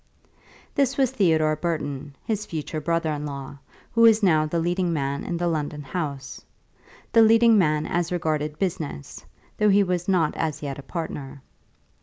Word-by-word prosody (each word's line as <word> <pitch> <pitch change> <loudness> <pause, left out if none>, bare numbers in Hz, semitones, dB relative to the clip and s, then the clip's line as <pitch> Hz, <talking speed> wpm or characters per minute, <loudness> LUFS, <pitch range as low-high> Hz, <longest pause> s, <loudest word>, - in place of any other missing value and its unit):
This 270 -1 +1
was 265 -3 +2
Theodore 160 -10 +2
Burton, 145 -3 -4
his 215 -1 -2
future 155 -1 -4
brother 165 0 0
in 150 -1 -3
law, 140 -1 -7 0.3
who 230 - +2
was 225 -1 +6
now 155 -5 +4
the 170 - -2
leading 175 +1 0
man 140 -3 -2
in 175 - -3
the 175 0 -1
London 150 -2 -2
house; 140 -2 -5 0.7
the 230 - +6
leading 225 +1 +6
man 155 -6 +2
as 175 0 -1
regarded 155 -3 -1
business, 165 - -4 0.4
though 210 0 +4
he 200 0 +5
was 180 -2 -2
not 175 -6 +2
as 155 -2 -3
yet 140 -1 -4
a - - -6
partner. 140 -3 -6
165 Hz, 165 wpm, -24 LUFS, 150-185 Hz, 0.7 s, was